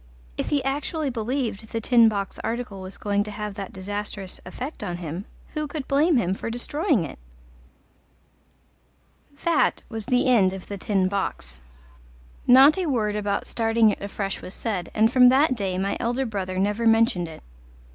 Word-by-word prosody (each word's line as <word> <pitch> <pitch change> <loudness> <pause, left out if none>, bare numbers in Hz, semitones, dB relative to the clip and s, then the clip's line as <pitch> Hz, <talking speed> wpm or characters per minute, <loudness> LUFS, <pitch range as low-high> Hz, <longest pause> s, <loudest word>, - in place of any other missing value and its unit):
If - - -3
he 285 -2 +1
actually 285 +2 -2
believed 230 -2 -2
The 225 - 0
Tin 230 0 +5
Box 200 -2 -4
article 225 -3 -4
was 185 +1 -8
going 205 -1 0
to - - -6
have 210 0 -5
that 195 -2 -6
disastrous 200 0 -6
effect 255 +7 -6
on 175 -4 -3
him, 175 +3 -5 0.3
who 305 0 -2
could 285 -1 -6
blame 295 +2 +3
him 185 -5 +1
for 195 - -4
destroying 250 - 0
it? 140 - -9 2.3
That 335 -3 +2
was 225 -1 -6
the 250 -1 +2
end 210 -8 +4
of 190 -1 -8
The 200 -1 -7
Tin 190 -1 +1
Box; 185 - -3 0.9
not 270 +7 +7
a 365 - -1
word 215 -7 0
about 205 -1 -1
starting 225 -1 +3
it - - -6
afresh 200 -1 -4
was 185 - -8
said, 195 -7 -3
and 220 +2 +3
from 250 -1 +8
that 265 +2 +4
day 195 -6 -2
my 195 +1 -1
elder 245 +3 0
brother 190 -5 -3
never 205 +4 +1
mentioned 225 -6 +3
it. 160 -1 -11
215 Hz, 170 wpm, -24 LUFS, 195-250 Hz, 2.3 s, from